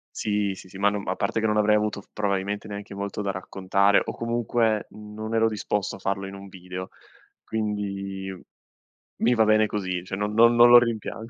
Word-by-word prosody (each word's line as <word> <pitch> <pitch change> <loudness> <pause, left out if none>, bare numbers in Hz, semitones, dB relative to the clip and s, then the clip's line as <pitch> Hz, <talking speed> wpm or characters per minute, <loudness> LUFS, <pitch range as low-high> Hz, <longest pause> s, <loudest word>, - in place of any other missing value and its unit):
Sì, 105 -2 0
sì, 95 - -12
sì, 95 - -11
ma 100 +1 +3
non 100 -1 -4
a 95 - 0
parte 100 +3 -1
che 110 - +1
non 105 0 +1
avrei 105 0 +4
avuto 105 -1 -1
probabilmente 100 0 -2
neanche 100 -1 -7
molto 100 +1 -4
da 100 - -1
raccontare 95 +1 +2
o - - -4
comunque 115 -2 0
non 105 +1 -8
ero 115 0 +3
disposto 105 -1 -2
a - - -12
farlo 95 0 -2
in 95 - -8
un 100 0 -10
video. 90 0 -8 0.5
Quindi 100 -3 -3 0.9
mi 120 +2 +4
va 115 -2 +4
bene 110 0 +4
così, 95 -4 -3
cioè 95 - -4
non 105 +1 -2
non 115 +1 +6
non 120 0 +8
lo 120 - +10
rimpiango. 115 -1 -1
105 Hz, 195 wpm, -25 LUFS, 100-110 Hz, 0.9 s, lo